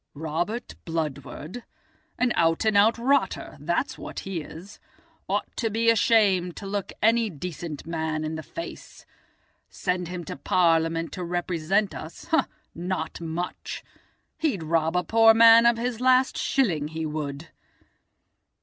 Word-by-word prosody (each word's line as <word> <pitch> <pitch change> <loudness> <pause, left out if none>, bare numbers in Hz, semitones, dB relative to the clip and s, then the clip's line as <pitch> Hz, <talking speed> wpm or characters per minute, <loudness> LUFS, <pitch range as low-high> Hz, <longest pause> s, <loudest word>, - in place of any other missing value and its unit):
"Robert 170 +10 -3
Bludward? 160 - -5 0.5
An 250 -1 +2
out 165 +3 +2
an' 215 -1 +2
out 215 +4 +5
rotter, 275 +4 0
that's - - -1
what - - -6
he 190 -4 -4
is. 170 +6 -11 0.5
Ought - - -2
to 230 - 0
be 230 +2 +3
ashamed 200 -6 +3
to - - -7
look 200 0 -3
any 225 0 +4
decent 165 -2 -6
man 160 -2 -2
in 155 +1 -3
the 160 - -4
face. 335 - -9 0.6
Send 180 -1 -2
him 180 0 -5
to - - -6
Parliament 165 +1 +1
to 180 - -5
represent 175 +3 0
us—not 175 - -4
much! 165 +2 -5 0.6
He'd 280 - 0
rob 165 +1 +1
a 180 - +1
poor 225 +1 +6
man 230 +1 +8
of 235 -1 +4
his 240 0 -3
last 255 0 +4
shilling, 175 - +1
he 160 +1 -4
would." 150 0 -5
180 Hz, 135 wpm, -26 LUFS, 160-225 Hz, 0.6 s, man